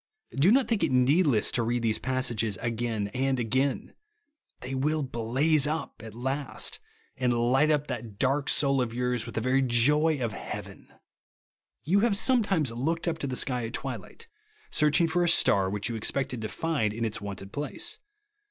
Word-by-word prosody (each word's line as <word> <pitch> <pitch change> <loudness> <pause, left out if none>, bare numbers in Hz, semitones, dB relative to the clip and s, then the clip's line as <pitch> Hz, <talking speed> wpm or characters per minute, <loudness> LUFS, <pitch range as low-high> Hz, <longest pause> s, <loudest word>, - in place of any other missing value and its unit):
Do 140 +7 +4
not 260 +4 +4
think 225 -6 0
it 160 - +1
needless 130 - +3
to 120 - +2
read 120 +1 -1
these 110 -1 0
passages 120 -5 -1
again 115 -3 -2
and 130 +3 -1
again. 130 +3 -1 0.7
They 125 +2 -6
will 150 +3 0
blaze 135 +5 +1
U23 155 +2 -2
at 110 -1 -10
last; 135 +3 -3 0.4
and 125 -1 +1
light 125 +5 +2
up 150 -1 +2
that 115 -6 -6
dark 135 +4 +1
soul 140 -2 +3
of 115 -2 -3
yours 125 -1 -1
wdth 115 - -8
the 110 - 0
very 130 +3 +2
joy 145 +6 +3
of 115 -4 -2
hea^ven. - - -8 1.0
You 185 +7 +2
have 215 -2 +2
sometimes 200 - +2
looked 160 +9 -2
up 165 -1 -1
to 140 - -3
the 130 - -3
sky 125 -3 0
at 115 - -10
twilight, 120 -8 -6 0.4
searching 155 +3 +3
for 175 +2 +1
a 175 - +3
star 95 -10 +4
which 105 +1 -2
you 120 - -3
expected 125 +2 -1
to 110 - -4
find 140 -11 -1
in 115 0 -2
its 110 -2 -4
wonted 100 -1 -7
place. 145 +1 -4
130 Hz, 180 wpm, -27 LUFS, 115-150 Hz, 1.0 s, Do